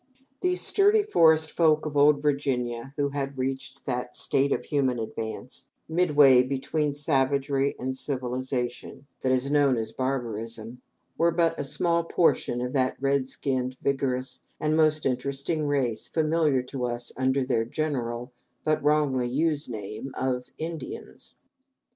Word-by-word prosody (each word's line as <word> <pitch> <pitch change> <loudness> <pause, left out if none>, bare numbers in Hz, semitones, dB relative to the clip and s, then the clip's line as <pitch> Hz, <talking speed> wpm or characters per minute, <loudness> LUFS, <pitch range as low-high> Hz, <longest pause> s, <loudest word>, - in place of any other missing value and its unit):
These 360 0 +1
sturdy 415 +1 +4
forest 160 - +4
folk 155 -2 +3
of 150 -1 -4
old 145 0 +5
Virginia, 135 -3 -1
who 140 -1 +1
had 140 -1 -4
reached 130 +1 -4
that 125 -1 -3
state 140 +1 +1
of - - -1
human 135 -4 +1
advance, 110 +2 -5 0.2
midway 150 -6 +5
between 140 +3 -1
savagery 140 -1 +1
and 130 +1 -3
civilization, 130 0 -3 0.2
that 130 - +1
is 130 +2 +1
known 140 -4 +4
as 110 -1 -3
barbarism, 115 -2 -4 0.4
were 170 - +4
but 165 -1 +2
a - - -1
small 170 +4 +1
portion 165 -7 +1
of 125 0 -3
that 130 -2 +1
red 135 -1 +1
skinned, 130 -1 -2
vigorous, 135 -2 -1 0.2
and 155 0 +1
most 155 -1 +3
interesting 140 +4 -1
race 130 -6 0
familiar 155 -4 +1
to 125 0 -4
us 120 0 -3
under 130 +1 +1
their 115 -3 +1
general 125 -2 -3 0.3
but 155 -2 +1
wrongly 145 -4 +2
used 150 +2 0
name 110 +3 -6
of 125 -1 -2
"Indians." 170 - -7
135 Hz, 140 wpm, -26 LUFS, 125-150 Hz, 0.4 s, old